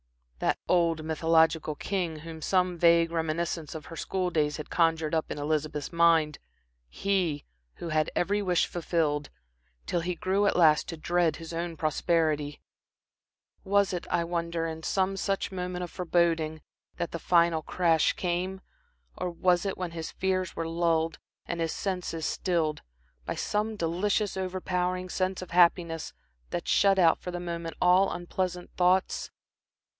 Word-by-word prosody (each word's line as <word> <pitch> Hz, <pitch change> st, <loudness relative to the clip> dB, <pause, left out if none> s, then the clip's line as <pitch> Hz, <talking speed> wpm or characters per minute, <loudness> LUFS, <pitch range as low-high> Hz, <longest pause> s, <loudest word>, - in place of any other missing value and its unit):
That -, -, +1 dB
old 165 Hz, -3 st, +2 dB
mythological 160 Hz, -1 st, +2 dB
king 170 Hz, -3 st, -3 dB
whom 160 Hz, 0 st, -8 dB
some 180 Hz, +1 st, +1 dB
vague 170 Hz, 0 st, +5 dB
reminiscence 165 Hz, -1 st, -2 dB
of 155 Hz, -2 st, -7 dB
her 165 Hz, -, -9 dB
school 185 Hz, +2 st, -2 dB
days 150 Hz, -3 st, +1 dB
had 150 Hz, -, -8 dB
conjured 165 Hz, -2 st, +2 dB
up 160 Hz, -1 st, 0 dB
in -, -, -4 dB
Elizabeth's 150 Hz, 0 st, -2 dB
mind, 165 Hz, -3 st, +3 dB, 0.5 s
he 175 Hz, -, -1 dB, 0.3 s
who 170 Hz, -, -6 dB
had 155 Hz, -1 st, +1 dB
every 205 Hz, +3 st, +1 dB
wish 180 Hz, -3 st, +2 dB
fulfilled, 155 Hz, -4 st, -1 dB, 0.6 s
till 175 Hz, -, 0 dB
he 175 Hz, +1 st, -2 dB
grew 195 Hz, +4 st, +1 dB
at -, -, +2 dB
last 155 Hz, -4 st, +4 dB
to 165 Hz, -, -5 dB
dread 170 Hz, 0 st, +1 dB
his 165 Hz, 0 st, -8 dB
own 170 Hz, 0 st, -3 dB
prosperity 155 Hz, -1 st, 0 dB, 1.0 s
was 200 Hz, 0 st, +2 dB
it, 175 Hz, -, -4 dB
I 170 Hz, -, +1 dB
wonder, 170 Hz, -1 st, -2 dB
in 160 Hz, 0 st, -5 dB
some 190 Hz, +3 st, 0 dB
such 195 Hz, 0 st, -1 dB
moment 180 Hz, -1 st, -4 dB
of 175 Hz, -, -6 dB
foreboding 165 Hz, -3 st, 0 dB, 0.3 s
that 170 Hz, -, -3 dB
the 170 Hz, -, -4 dB
final 170 Hz, -1 st, +3 dB
crash 165 Hz, -1 st, +2 dB
came, 185 Hz, +2 st, -2 dB, 0.5 s
or 180 Hz, -, -3 dB
was 175 Hz, +2 st, +2 dB
it 195 Hz, -, -3 dB
when 180 Hz, -2 st, -3 dB
his 165 Hz, -1 st, -5 dB
fears 185 Hz, -1 st, -1 dB
were 165 Hz, -, -2 dB
lulled 165 Hz, -1 st, 0 dB, 0.3 s
and 170 Hz, 0 st, -3 dB
his 165 Hz, -1 st, 0 dB
senses 180 Hz, -4 st, -3 dB
stilled, 165 Hz, -5 st, 0 dB, 0.4 s
by -, -, -3 dB
some 215 Hz, +1 st, -1 dB
delicious, 200 Hz, +4 st, 0 dB
over 185 Hz, 0 st, -3 dB
powering 180 Hz, 0 st, -1 dB
sense 185 Hz, 0 st, -1 dB
of 185 Hz, -, -12 dB
happiness 170 Hz, -2 st, +3 dB, 0.4 s
that -, -, -4 dB
shut 195 Hz, 0 st, +4 dB
out 170 Hz, -3 st, +5 dB
for -, -, -6 dB
the 175 Hz, 0 st, -4 dB
moment 170 Hz, -1 st, -5 dB
all 180 Hz, +2 st, +4 dB
unpleasant 180 Hz, 0 st, -3 dB
thoughts? 185 Hz, +1 st, +2 dB
170 Hz, 155 wpm, -28 LUFS, 160-180 Hz, 1.0 s, vague